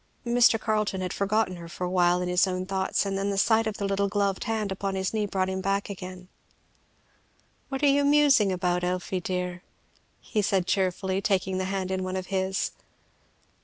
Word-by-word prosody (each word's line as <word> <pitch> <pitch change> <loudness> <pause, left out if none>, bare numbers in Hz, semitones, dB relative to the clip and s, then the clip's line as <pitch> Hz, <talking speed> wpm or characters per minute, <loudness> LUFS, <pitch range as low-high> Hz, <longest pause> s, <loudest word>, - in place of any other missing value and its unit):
Mr. 235 -1 +4
Carleton 215 -3 -1
had 180 -1 -3
forgotten 200 -2 0
her 170 -1 -9
for 175 - -6
awhile 180 0 +2
in - - -3
his 180 +2 +3
own 185 0 -2
thoughts, 190 +1 0
and 195 -1 -2
then 200 +1 -1
the 200 - -2
sight 220 +2 +3
of 220 - -3
the 200 - -2
little 200 0 +1
gloved 200 -1 -1
hand 220 -3 -1
upon 195 0 -3
his 190 +1 -2
knee 215 -2 0
brought 190 -1 0
him 190 0 -3
back 195 +1 -1
again. 185 -1 -8 1.4
"What 270 +1 -4
are - - +6
you 285 0 +4
musing 285 -8 +4
about, 180 -1 0
Elfie, 180 +1 -1
dear?" 180 0 -3 0.6
he 215 - -1
said 195 -2 +1
cheerfully, 190 0 0
taking 190 -1 0
the 185 - -1
hand 190 -1 -2
in 190 0 -1
one 185 0 -3
of 185 -1 -3
his. 190 0 0
190 Hz, 195 wpm, -27 LUFS, 185-205 Hz, 1.4 s, are